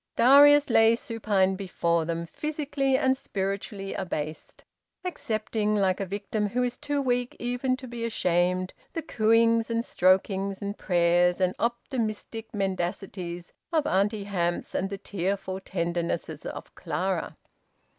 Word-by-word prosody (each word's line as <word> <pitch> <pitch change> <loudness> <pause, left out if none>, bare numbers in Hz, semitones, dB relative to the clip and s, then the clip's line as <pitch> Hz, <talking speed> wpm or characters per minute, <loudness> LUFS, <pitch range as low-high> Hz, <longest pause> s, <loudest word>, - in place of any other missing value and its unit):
Darius 285 +2 +7
lay 225 0 +6
supine 210 -5 0
before 170 -4 0
them, 170 0 -2
physically 285 - -1
and 260 0 +3
spiritually 195 -3 -4
abased, 155 -4 -5 0.4
accepting, 215 -9 -1
like 190 -3 +2
a 195 - -2
victim 205 +2 -2
who 250 +4 0
is 245 0 -1
too 290 +2 -2
weak 245 -2 0
even 245 +2 -1
to 260 -1 -9
be 235 -1 -6
ashamed, 185 -4 +1 0.2
the 330 - -3
cooings 230 -2 +3
and 230 0 0
strokings 190 +1 +2
and 200 0 -4
prayers 175 -1 +2
and 185 -1 +2
optimistic 230 -2 -3
mendacities 185 -2 -3 0.2
of 315 -3 +2
Auntie 200 +2 +1
Hamps, 175 -4 -2
and 195 - -1
the 200 - -4
tearful 190 0 -3
tendernesses 170 -4 -3
of - - -8
Clara. 175 +3 -2
200 Hz, 130 wpm, -27 LUFS, 185-235 Hz, 0.4 s, Darius